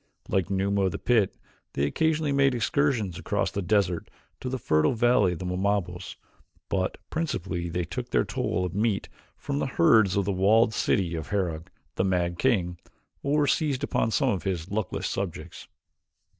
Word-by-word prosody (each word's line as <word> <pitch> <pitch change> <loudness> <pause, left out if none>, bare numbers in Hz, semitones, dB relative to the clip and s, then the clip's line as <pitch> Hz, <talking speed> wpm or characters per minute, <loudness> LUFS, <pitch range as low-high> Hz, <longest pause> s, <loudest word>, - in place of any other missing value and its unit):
Like 95 -1 0
Numa 100 0 +1
of 95 - 0
the - - -2
pit 110 -6 +1 0.4
they 70 - +1
occasionally 155 - +1
made 135 -2 +3
excursions 115 - 0
across 85 - -1
the 100 - -2
desert 90 -2 +1 0.3
to 130 - -4
the 130 - -2
fertile 75 -9 +2
valley 120 -5 +3
of - - -6
the 95 - -6
Wamabos, 90 -1 -1 0.5
but 95 -1 -1
principally 95 - -2
they 90 +1 -1
took - - -5
their - - +2
toll 90 +1 -1
of 90 - -4
meat 105 0 0 0.3
from 140 0 -3
the - - 0
herds 95 +2 +5
of 100 - +1
the 100 - 0
walled 110 +4 +4
city 90 -5 +1
of 80 -2 -4
Herog, 85 -6 -2 0.3
the - - +2
mad 90 -2 0
king, 90 -9 +1 0.4
or 145 +1 +2
seized 145 -2 0
upon 130 - +1
some 100 - +2
of 95 - 0
his 95 -2 -3
luckless 105 -2 -2
subjects. 85 -3 -5
100 Hz, 170 wpm, -27 LUFS, 90-115 Hz, 0.5 s, herds